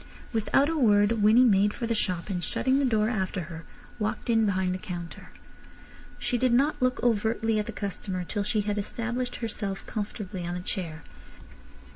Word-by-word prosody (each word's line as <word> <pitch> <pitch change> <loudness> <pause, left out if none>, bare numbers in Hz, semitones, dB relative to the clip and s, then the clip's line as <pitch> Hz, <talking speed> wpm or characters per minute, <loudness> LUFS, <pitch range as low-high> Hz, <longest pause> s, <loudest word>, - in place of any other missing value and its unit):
Without 230 +5 +3
a 325 - -1
word 215 -4 +4
Winnie 220 +4 +6
made 205 -2 +4
for 235 - -3
the 230 - 0
shop, 185 -3 -1
and 180 -2 -2
shutting 265 +9 +1
the 280 - +2
door 220 -4 +2
after 195 -4 -1
her, 165 0 -8 0.3
walked 215 +2 -1
in 225 -1 +3
behind 185 -2 +1
the 185 - -4
counter. 175 -2 -7 0.9
She 245 - -1
did 255 0 +3
not 275 +5 +2
look 255 -1 +1
overtly 225 -1 +1
at 210 - -2
the - - -3
customer 195 -3 -4
till 205 +4 -3
she 210 +1 +1
had 205 0 -1
established 240 +4 -3
herself 210 -4 -4
comfortably 205 -3 -5
on 175 +1 -3
the - - -3
chair. 170 -4 -5
210 Hz, 180 wpm, -27 LUFS, 190-235 Hz, 0.9 s, Winnie